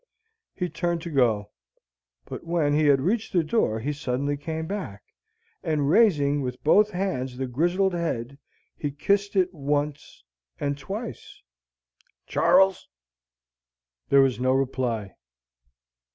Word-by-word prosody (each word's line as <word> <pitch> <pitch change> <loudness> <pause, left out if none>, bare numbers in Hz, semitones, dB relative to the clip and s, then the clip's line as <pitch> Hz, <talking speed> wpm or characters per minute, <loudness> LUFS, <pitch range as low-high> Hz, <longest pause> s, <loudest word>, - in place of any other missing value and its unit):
He 180 - -2
turned 175 -1 -2
to 170 - -6
go. 110 -7 +1 0.7
But - - -8
when 165 -3 +1
he 155 +1 +3
had 140 -2 +4
reached 205 - -1
the 175 -3 +3
door 155 - 0
he 145 +6 -2
suddenly 140 0 -2
came 160 +2 -4
back, 175 - -5 0.6
and, 150 -2 0
raising 145 -10 +4
with 125 -1 -5
both 210 +7 +5
hands 175 -10 -3
the 130 - -2
grizzled 175 +9 +1
head, 140 -6 -3 0.4
he 145 - -3
kissed 200 +8 0
it 185 -1 +2
once 145 - -3 0.4
and 140 0 -1
twice. 200 - -7 0.8
"Char 180 +3 +5
les." 190 -1 -9 1.2
There 140 - +6
was 130 -3 +2
no 130 +1 +2
reply. 125 -6 -1
145 Hz, 130 wpm, -25 LUFS, 135-180 Hz, 1.2 s, There